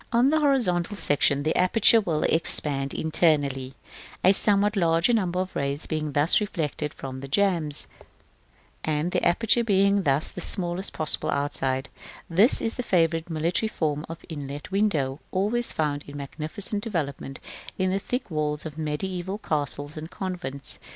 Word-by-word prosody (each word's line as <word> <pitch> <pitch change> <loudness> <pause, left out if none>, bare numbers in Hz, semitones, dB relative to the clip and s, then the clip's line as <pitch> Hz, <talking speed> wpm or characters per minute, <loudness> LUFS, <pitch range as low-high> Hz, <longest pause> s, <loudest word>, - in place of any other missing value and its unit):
§ - - -20
XIV. - - -35
On 240 +3 +4
the 315 - +3
horizontal 210 - +1
section 145 -4 +2
the 155 - 0
aperture 220 +5 +4
will 160 -6 -1
expand 140 -4 +3
internally, 145 -5 +1 0.5
a 190 - +6
somewhat 205 +1 +3
larger 170 +3 +3
number 185 -5 0
of 185 0 -3
rays 140 +1 -1
being 155 -2 -3
thus 150 +8 +3
reflected 150 -7 -3
from 130 -2 -7
the 135 - -7
jambs; 165 -2 +1 1.0
and 155 +3 -1
the - - 0
aperture 225 +6 +3
being 200 -2 +3
thus 145 -2 +1
the 180 - -7
smallest 175 +2 -1
possible 155 -1 -1
outside, 135 -2 -1 0.4
this 195 +9 +4
is 225 - 0
the - - -1
favorite 165 -6 +1
military 170 +7 0
form 150 -6 -2
of 165 0 -9
inlet 145 0 -7
window, 155 -10 0
always 215 +6 0
found 145 -2 -1
in 145 0 -8
magnificent 155 +9 -3
development 140 - -4 0.4
in 185 -1 +1
the 195 - 0
thick 245 0 -4
walls 150 -1 -2
of 155 -1 -7
mediæval 180 +5 -3
castles 145 -1 -3
and 155 +1 -6
convents. 175 -9 -4
165 Hz, 155 wpm, -25 LUFS, 145-195 Hz, 1.0 s, a